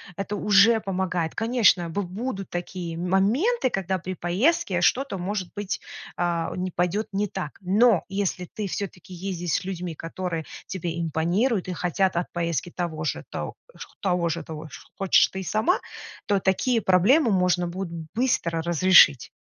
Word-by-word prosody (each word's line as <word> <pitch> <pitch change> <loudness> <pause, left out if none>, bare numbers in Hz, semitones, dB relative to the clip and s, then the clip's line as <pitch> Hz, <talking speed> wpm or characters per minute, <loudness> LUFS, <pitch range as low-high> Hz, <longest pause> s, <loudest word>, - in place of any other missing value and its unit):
это 200 +3 -3
уже 210 +3 +5
помогает. 185 -4 -2
Конечно, 225 -7 +3
б 185 +5 -2
будут 195 +2 -5
такие 175 -1 -4
моменты, 215 - +1
когда 190 0 -1
при 185 +2 -5
поездке 190 - +1
что-то 260 -1 +2
может 185 0 -3
быть, 205 0 -3 0.3
а, 170 -1 -1
не 185 0 -2
пойдет 180 +5 -1
не 205 +2 0
так. 150 -5 -6
Но 200 +2 +4
если 195 -2 -2
ты 210 -2 -3
всё-таки 185 -1 -6
ездишь 175 -2 -3
с - - +1
людьми, 180 -3 -5
которые 165 0 -4 0.2
тебе 170 -2 -4
импонируют 175 - 0
и 180 - -3
хотят 180 +2 0
от 170 +1 -2
поездки 170 -1 -2
того 160 -3 -4
же, - - -2
то - - -4 0.5
того 180 -3 +1
же 165 0 -3
тож 155 -1 -9
хочешь 195 -2 +4
ты 190 - -5
сама, 220 - +1 0.5
то 200 -1 +2
такие 225 +6 +1
проблемы 215 - +4
можно 180 -2 +2
будет 170 -2 -5
быстро 170 -9 0
разрешить. 170 -5 +5
185 Hz, 150 wpm, -25 LUFS, 170-205 Hz, 0.5 s, уже